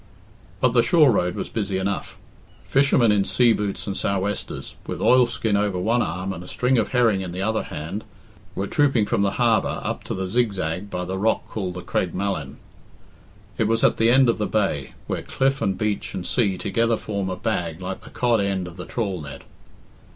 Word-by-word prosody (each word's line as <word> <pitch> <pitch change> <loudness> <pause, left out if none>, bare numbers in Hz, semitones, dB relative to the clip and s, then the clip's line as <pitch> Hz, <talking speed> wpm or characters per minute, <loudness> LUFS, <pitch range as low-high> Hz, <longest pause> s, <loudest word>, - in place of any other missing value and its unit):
But 125 - +4
the 120 - +6
shore 155 -2 +5
road 90 -4 +1
was - - -3
busy 100 -4 -2
enough. 95 +1 -3 0.5
Fishermen 135 -4 +4
in 100 -1 +3
sea 120 +3 +3
boots 105 -2 -3
and 100 - -3
sou'westers, 100 +1 -2
with - - -4
oilskin 120 -4 +3
over 100 -2 +1
one 115 +7 +1
arm 90 +2 -2
and 85 - -8
a - - -11
string 125 +4 +1
of 110 - 0
herring 115 -6 +3
in 90 -2 -5
the 95 +2 -3
other 110 +2 +1
hand, 85 +8 -6 0.5
were 95 - -1
trooping 135 -2 +2
from 100 - 0
the 100 -1 +1
harbour 115 -3 +2
up - - -3
to - - -3
the 95 0 -3
Zigzag 100 -4 -1
by 90 -2 -3
the 95 +1 -3
rock 110 +2 +1
called 95 -4 -4
the 90 - -5
Creg 90 - -1
Malin. 90 -8 -3 1.0
It 110 - +3
was 115 +1 +1
at - - +4
the 115 +1 +4
end 130 +1 +6
of 115 - +1
the 105 - 0
bay, 95 -11 -1
where - - -3
cliff 135 +1 0
and 95 -1 0
beach 105 -1 -2
and 90 - -4
sea 100 -6 +1
together 115 +4 +1
form 100 -3 -3
a 95 - -2
bag 90 -5 -2
like 95 +1 -5
the - - -12
cod 120 -3 +1
end 95 -2 -1
of 90 0 -11
the 90 - -7
trawl 100 -7 -2
net. 70 -1 -9
100 Hz, 205 wpm, -23 LUFS, 95-115 Hz, 1.0 s, the